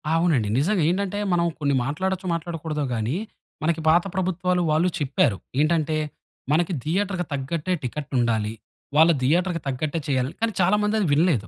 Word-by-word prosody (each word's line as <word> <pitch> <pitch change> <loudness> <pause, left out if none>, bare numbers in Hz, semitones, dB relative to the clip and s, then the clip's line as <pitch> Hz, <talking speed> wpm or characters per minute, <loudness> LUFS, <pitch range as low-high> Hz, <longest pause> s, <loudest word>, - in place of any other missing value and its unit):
అవునండి. 160 -10 +2
నిజంగా 180 +3 +2
ఏంటంటే 200 +2 -1 0.2
మనం 170 -1 +2
కొన్ని 140 -2 +1
మాట్లాడచ్చో 185 +6 -2
మాట్లాడకూడదో 160 -2 -3
గాని 115 +8 -1 0.5
మనకి 160 0 +1
పాత 170 +2 +5
ప్రభుత్వాలు 180 -1 0
వాళ్ళు 160 +4 +3
చెప్పారు. 130 -8 +1 0.2
ఏంటంటే 155 0 +2 0.5
మనకి 175 +3 +2
థియేటర్‌కి 185 +2 -1
తగ్గట్టే 150 +6 -2
టికెటుండాలి 120 -5 -1 0.4
వాళ్ళ 160 +2 +7
థియేటర్‌కి 170 +5 +1
తగ్గట్టే 145 +5 -2
చేయాలి. 130 -1 0
కానీ, 225 0 +1
చాలా 185 +3 +4
మంది 210 +1 +1
అది 200 - +1
వినలేదు. 145 - +2
165 Hz, 140 wpm, -24 LUFS, 140-180 Hz, 0.5 s, వాళ్ళ